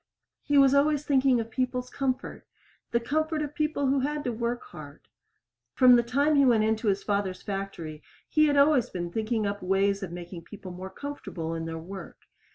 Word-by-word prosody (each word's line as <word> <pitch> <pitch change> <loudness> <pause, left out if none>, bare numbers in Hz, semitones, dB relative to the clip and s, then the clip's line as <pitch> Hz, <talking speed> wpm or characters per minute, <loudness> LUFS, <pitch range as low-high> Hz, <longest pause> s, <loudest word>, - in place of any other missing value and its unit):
He 290 - +1
was 275 -1 +6
always 295 +1 +3
thinking 265 -3 +3
of 225 0 -5
people's 250 0 -2
comfort 265 -2 -3 0.4
the 235 - +1
comfort 310 +5 -1
of 295 0 -5
people 305 -3 -1
who 270 +1 +2
had 295 +2 -2
to 245 - -1
work 235 +1 -3
hard. 145 -2 -12 0.7
From 250 -1 +7
the 240 - +5
time 280 +6 +1
he 280 - +5
went 235 -5 +4
into 220 +1 0
his 200 -1 +1
father's 200 -3 -2
factory 195 -6 -5 0.3
he 305 0 +3
had 285 -1 +2
always 280 -4 +4
been 175 -1 -5
thinking 220 +1 -1
up 205 0 -3
ways 195 +2 +1
of 190 -3 -5
making 175 0 -8
people 200 -3 -10
more 185 +2 -7
comfortable 190 - -6
in 165 0 -4
their 165 0 -5
work. 185 +3 -9
235 Hz, 190 wpm, -27 LUFS, 195-280 Hz, 0.7 s, From